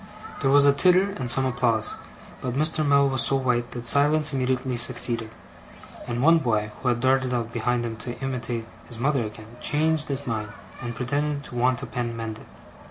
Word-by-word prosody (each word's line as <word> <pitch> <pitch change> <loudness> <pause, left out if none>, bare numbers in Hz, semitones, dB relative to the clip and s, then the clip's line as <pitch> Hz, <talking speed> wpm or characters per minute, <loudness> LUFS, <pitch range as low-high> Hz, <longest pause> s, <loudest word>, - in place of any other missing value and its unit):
There 135 - +1
was 140 +1 +6
a 140 - +6
titter, 185 +6 +3
and 125 -2 -1
some 135 +2 +5
applause; 120 -4 +1 0.5
but 125 -1 -3
Mr. 155 +2 +1
Mell 140 -1 +4
was 130 -2 +1
so 135 - +5
white, 125 -2 0
that 120 -1 -7
silence 145 +3 +4
immediately 130 -1 -1
succeeded; 120 -2 0 0.8
and 120 +1 -2
one 165 +2 +6
boy, 110 -6 -1
who 130 - -3
had 120 -1 +1
darted 130 -1 +1
out 115 -1 -3
behind 120 +1 -1
him 115 -1 -4
to 120 +2 -7
imitate 125 -3 -4 0.2
his 120 - -7
mother 135 +1 0
again, 110 +2 -10
changed 155 +2 +1
his 140 0 -4
mind, 110 -3 -4 0.3
and 120 -1 -5
pretended 145 +3 -2
to 125 - -10
want 125 +2 +1
a - - -3
pen 120 -1 -4
mended. 110 -1 -7
125 Hz, 190 wpm, -24 LUFS, 120-140 Hz, 0.8 s, was